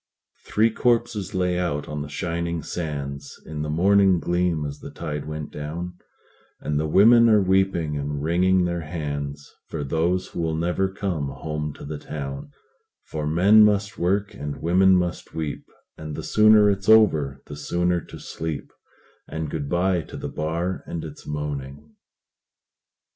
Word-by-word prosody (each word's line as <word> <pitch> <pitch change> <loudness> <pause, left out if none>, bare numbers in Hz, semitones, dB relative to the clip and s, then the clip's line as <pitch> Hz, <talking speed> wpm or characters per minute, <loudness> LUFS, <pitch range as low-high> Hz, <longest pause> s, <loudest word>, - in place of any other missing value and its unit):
Three 110 +2 +3
corpses 115 -4 0
lay 90 -1 +1
out 75 -5 -2
on 75 -1 -4
the 75 - -6
shining 85 0 -3
sands 70 -4 -5
In 75 -1 -5
the 75 - -3
morning 95 +3 +4
gleam 85 -3 0
as 70 0 -6
the - - -9
tide 75 -3 -5
went 75 -1 -5
down, 85 +5 -5 0.7
And 75 -1 -1
the 80 - 0
women 115 +8 +6
are 105 -1 +6
weeping 95 -6 +1
and 70 0 -3
wringing 90 +3 +3
their 85 -1 -2
hands 70 -3 -5
For 80 -3 -4
those 85 +6 0
who - - -4
will 80 -1 -1
never 90 +4 0
come 90 -7 -2
home 75 +2 -4
to - - -10
the 75 0 -5
town; 70 -1 -6 0.5
For 75 -1 -4
men 100 +7 +6
must 105 -1 +1
work, 100 +3 0
and 75 -1 -6
women 95 +3 +4
must 90 -1 -2
weep, 80 -3 -4 0.3
And 75 -1 -6
the - - -5
sooner 110 -1 +6
it's 100 0 0
over, 75 -12 +4
the 75 - -8
sooner 85 +4 0
to - - -11
sleep; 80 -2 -6 0.5
And 80 -1 -4
good 70 -3 -3
by 90 +1 +1
to - - -10
the - - -5
bar 85 +4 -2
and 85 -2 -5
its 75 -1 -10
moaning. 75 0 -5
80 Hz, 160 wpm, -24 LUFS, 75-95 Hz, 0.7 s, women